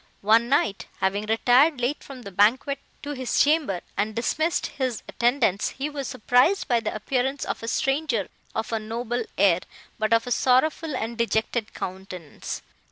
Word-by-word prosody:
One 225 Hz, +3 st, +4 dB
night, 220 Hz, -8 st, +1 dB
having 200 Hz, +2 st, -1 dB
retired 250 Hz, +6 st, +4 dB
late 245 Hz, +5 st, -1 dB
from 260 Hz, -3 st, -10 dB
the 200 Hz, -, -8 dB
banquet 245 Hz, +9 st, +2 dB, 0.2 s
to 290 Hz, -, -4 dB
his 260 Hz, -3 st, -1 dB
chamber, 285 Hz, -, +2 dB
and 210 Hz, +1 st, -1 dB
dismissed 315 Hz, +8 st, 0 dB
his 255 Hz, -5 st, -3 dB
attendants, 235 Hz, -5 st, +1 dB
he 285 Hz, +3 st, -2 dB
was 280 Hz, -3 st, -4 dB
surprised 250 Hz, -, +2 dB
by 240 Hz, -4 st, +3 dB
the 215 Hz, -2 st, -3 dB
appearance 260 Hz, +5 st, -1 dB
of -, -, -4 dB
a 230 Hz, -, -6 dB
stranger 270 Hz, -, 0 dB, 0.3 s
of 225 Hz, -, -2 dB
a 225 Hz, -, +1 dB
noble 230 Hz, +2 st, -3 dB
air, 190 Hz, -3 st, +5 dB, 0.4 s
but 215 Hz, 0 st, 0 dB
of 230 Hz, 0 st, +4 dB
a 245 Hz, -, -5 dB
sorrowful 275 Hz, +5 st, +2 dB
and 230 Hz, -1 st, -4 dB
dejected 225 Hz, 0 st, -1 dB
countenance. 185 Hz, -4 st, -6 dB
240 Hz, 165 wpm, -25 LUFS, 215-270 Hz, 0.4 s, air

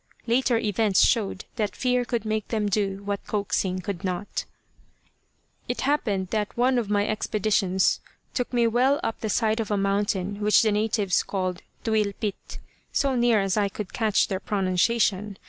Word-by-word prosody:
Later 245 Hz, 0 st, +2 dB
events 210 Hz, -2 st, +3 dB
showed 205 Hz, -5 st, 0 dB
that 205 Hz, -4 st, -1 dB
fear 250 Hz, -1 st, +1 dB
could 235 Hz, -3 st, -2 dB
make 215 Hz, -1 st, -1 dB
them 215 Hz, -2 st, -1 dB
do 200 Hz, -1 st, -1 dB
what 200 Hz, 0 st, -3 dB
coaxing 190 Hz, -2 st, -1 dB
could 190 Hz, 0 st, -5 dB
not. 185 Hz, +2 st, -3 dB, 1.2 s
It 245 Hz, -, -2 dB
happened 210 Hz, -10 st, 0 dB
that 210 Hz, +1 st, -2 dB
one 250 Hz, +1 st, +3 dB
of 220 Hz, -4 st, -3 dB
my 205 Hz, 0 st, +2 dB
expeditions 205 Hz, -3 st, +1 dB, 0.3 s
took 250 Hz, -, -2 dB
me 240 Hz, -2 st, +2 dB
well 250 Hz, +5 st, +3 dB
up 225 Hz, -, -2 dB
the 220 Hz, -, -2 dB
side 220 Hz, +1 st, +1 dB
of 225 Hz, -, -2 dB
a 205 Hz, -, +1 dB
mountain 200 Hz, 0 st, 0 dB
which 210 Hz, +2 st, +5 dB
the 215 Hz, -, +2 dB
natives 210 Hz, -2 st, +1 dB
called 185 Hz, -2 st, -3 dB, 0.2 s
Tuylpit, 210 Hz, -2 st, -2 dB, 0.3 s
so 275 Hz, -2 st, +1 dB
near 240 Hz, -3 st, +3 dB
as 195 Hz, +1 st, 0 dB
I 205 Hz, -1 st, +2 dB
could 200 Hz, -1 st, -7 dB
catch 220 Hz, -3 st, +2 dB
their 190 Hz, -, -2 dB
pronunciation. 200 Hz, +1 st, +1 dB
210 Hz, 165 wpm, -25 LUFS, 195-225 Hz, 1.2 s, which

